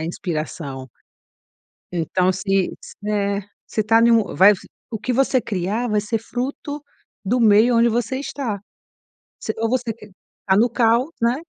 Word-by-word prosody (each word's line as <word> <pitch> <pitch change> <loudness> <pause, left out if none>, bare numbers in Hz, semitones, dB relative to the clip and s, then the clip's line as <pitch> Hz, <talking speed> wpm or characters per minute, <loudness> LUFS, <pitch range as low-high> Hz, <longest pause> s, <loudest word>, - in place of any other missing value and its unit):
é - - -3
inspiração. 155 -5 -4 1.1
Então, 180 +2 +1
se 195 0 0
s - - -11
é 200 -1 0 0.3
se 215 - -1
tá 225 +2 +4
num 230 -3 +3
vai 195 +3 +7 0.4
o 225 - -4
que 250 +4 -2
você 260 +1 +2
criar 210 +4 -2
vai 210 -1 +2
ser 210 +2 -2
fruto 270 +5 -5 0.4
do 240 +6 +1
meio 225 +2 +5
onde 235 +1 +5
você 240 +3 -1
está. 260 -7 -4 0.8
Se, 220 - -3
ou 225 0 0
você 245 -2 -1
q 215 -2 -15 0.4
tá 190 - +4
no 235 +4 +4
caos, 235 +4 +2
né? 235 +1 +3
220 Hz, 155 wpm, -21 LUFS, 195-240 Hz, 1.1 s, vai